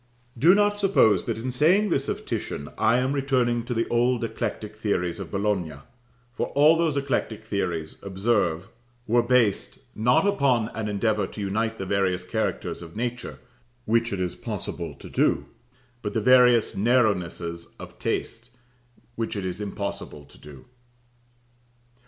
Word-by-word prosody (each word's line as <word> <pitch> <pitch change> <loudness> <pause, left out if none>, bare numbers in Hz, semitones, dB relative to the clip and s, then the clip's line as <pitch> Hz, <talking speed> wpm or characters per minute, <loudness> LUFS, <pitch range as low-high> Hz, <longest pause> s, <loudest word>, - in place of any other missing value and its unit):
Do 165 +10 +5
not 205 0 +2
suppose 115 - +3
that - - -2
in 125 +3 -3
saying 175 +11 +3
this 135 -5 0
of - - -4
Titian, 70 +1 -4
I 110 +2 +3
am 130 +2 0
returning 130 -4 +1
to 120 - -3
the 115 - 0
old 120 0 +2
eclectic 105 -2 -4
theories 90 -6 -1
of - - -6
Bologna; 100 -6 -1 0.6
for - - -2
all 150 +3 +6
those 165 -3 +1
eclectic 130 -6 -2
theories, 85 -7 -3
observe, 95 -3 0 0.4
were 120 +1 +3
based, 120 -4 +1 0.2
not 125 - +3
upon 135 - +2
an 110 -1 -4
endeavour 105 +1 0
to 105 - -8
unite 110 +3 -1
the 95 - -4
various 95 -2 0
characters 90 - -3
of 85 -1 -11
nature 120 +2 -4 0.5
(which 115 +1 +1
it 100 - -3
is 90 -1 -2
possible 80 -4 -5
to - - -12
do), - - +1 0.6
but 105 - -5
the - - +3
various 125 0 +5
narrownesses 95 -7 0
of - - -11
taste, 115 +1 -3 0.6
which 115 -1 -3
it 100 -2 -3
is 90 +2 -4
impossible 100 -7 -5
to - - -19
do. 70 -3 -13
110 Hz, 150 wpm, -25 LUFS, 95-125 Hz, 0.6 s, all